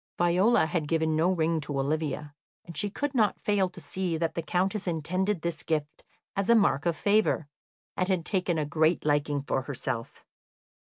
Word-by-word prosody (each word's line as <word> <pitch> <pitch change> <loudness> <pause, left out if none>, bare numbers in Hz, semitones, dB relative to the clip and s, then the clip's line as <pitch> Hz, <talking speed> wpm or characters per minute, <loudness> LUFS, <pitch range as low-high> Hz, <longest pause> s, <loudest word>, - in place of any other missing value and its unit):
Viola 180 +5 +4
had 160 -1 -2
given 160 0 +1
no 165 +4 +3
ring 165 -2 +1
to 145 -1 -3
Olivia, 150 +1 -2 0.3
and 170 - -10
she 205 - -1
could 285 +7 -3
not 220 -5 +2
fail 200 -3 +1
to 180 - -12
see 170 +2 -2
that 165 0 -1
the 170 - -2
Countess 185 +5 -1
intended 180 +3 -1
this 170 -1 -2
gift 150 -2 -3 0.3
as 195 +2 -1
a 235 - +7
mark 185 -8 +3
of 170 - +1
favour, 205 -7 +2 0.5
and 185 - 0
had 180 -3 0
taken 180 -4 0
a 155 - 0
great 155 +3 +1
liking 145 -1 +1
for 135 - -1
herself. 125 -4 -5
170 Hz, 180 wpm, -28 LUFS, 155-190 Hz, 0.5 s, a